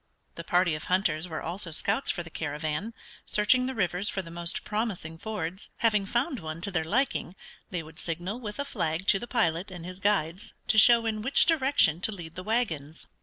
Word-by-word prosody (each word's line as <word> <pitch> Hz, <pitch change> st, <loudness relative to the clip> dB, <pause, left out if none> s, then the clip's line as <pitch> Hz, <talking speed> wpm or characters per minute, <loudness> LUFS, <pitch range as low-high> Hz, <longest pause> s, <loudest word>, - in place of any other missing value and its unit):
The 170 Hz, -, -7 dB
party 175 Hz, 0 st, +2 dB
of 155 Hz, -, -5 dB
hunters 180 Hz, -3 st, +1 dB
were 160 Hz, -3 st, -5 dB
also 175 Hz, +2 st, -1 dB
scouts 200 Hz, -, +1 dB
for 175 Hz, -, 0 dB
the 165 Hz, -, -12 dB
caravan, 155 Hz, +8 st, -3 dB, 0.3 s
searching 255 Hz, +5 st, +3 dB
the 265 Hz, -, -4 dB
rivers 190 Hz, -1 st, +1 dB
for 190 Hz, -, -3 dB
the 165 Hz, -, -10 dB
most 170 Hz, 0 st, -1 dB
promising 200 Hz, -7 st, -3 dB
fords. 190 Hz, -3 st, -5 dB
Having 210 Hz, -4 st, +2 dB
found 255 Hz, +6 st, 0 dB
one 155 Hz, -1 st, -6 dB
to 200 Hz, -, -1 dB
their 170 Hz, -4 st, 0 dB
liking, 205 Hz, -1 st, 0 dB, 0.3 s
they 175 Hz, -3 st, -3 dB
would 155 Hz, 0 st, -13 dB
signal 175 Hz, +7 st, -4 dB
with 210 Hz, -4 st, -6 dB
a 285 Hz, -, -2 dB
flag 165 Hz, -, -2 dB
to 195 Hz, -, +5 dB
the 240 Hz, -, -6 dB
pilot 185 Hz, -7 st, 0 dB
and 175 Hz, -3 st, -8 dB
his 180 Hz, +1 st, -8 dB
guides 195 Hz, -3 st, 0 dB
to 215 Hz, -, +6 dB
show 230 Hz, +1 st, +7 dB
in 215 Hz, -1 st, -1 dB
which 265 Hz, +6 st, +4 dB
direction 270 Hz, -, +3 dB
to 220 Hz, -, +1 dB
lead 170 Hz, -5 st, -8 dB
the 185 Hz, -, -6 dB
wagons. 175 Hz, -, -2 dB
185 Hz, 205 wpm, -28 LUFS, 165-220 Hz, 0.3 s, show